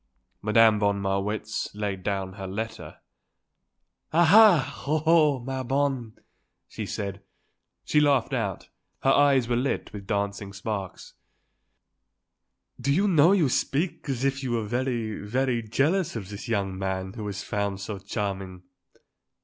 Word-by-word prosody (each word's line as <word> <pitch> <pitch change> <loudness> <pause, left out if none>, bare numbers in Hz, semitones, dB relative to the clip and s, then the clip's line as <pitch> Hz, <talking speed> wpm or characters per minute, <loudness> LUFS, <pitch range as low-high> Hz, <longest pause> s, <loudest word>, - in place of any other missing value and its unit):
Madame 110 0 +5
von 100 -1 +1
Marwitz 100 +2 -2
laid 100 -2 -3
down 95 -1 -2
her 95 -1 -7
letter. 110 +4 -6 1.1
"Ah! 165 0 +4 0.4
ah! - - -12
oh! 155 +1 +1
oh! 155 -4 +4
ma 130 +1 -4
bonne," 130 -3 -1 0.5
she - - -6
said. 100 -1 -4 0.6
She 150 - +3
laughed 140 -3 +2
out. 100 -8 -3 0.3
Her 135 - +4
eyes 140 -3 +4
were 120 - +1
lit 130 +3 -2
with 100 -2 -8
dancing 100 -1 -2
sparks. 100 -2 -5 1.7
"Do 135 +3 0
you 195 +8 +3
know 165 -2 +5
you 185 -7 +4
speak 145 +5 -1
as 130 -1 -2
if 135 0 0
you 130 -3 -2
were 115 -2 -1
very, 120 -1 -2
very 120 +3 0
jealous 145 - 0
of 100 -5 -5
this 100 0 -8
young 100 -4 -1
man 95 0 -3
who 105 -3 -6
is 100 -1 -5
found 100 -1 -2
so 100 0 -5
charming?" 95 -3 -4
110 Hz, 140 wpm, -26 LUFS, 100-135 Hz, 1.7 s, Madame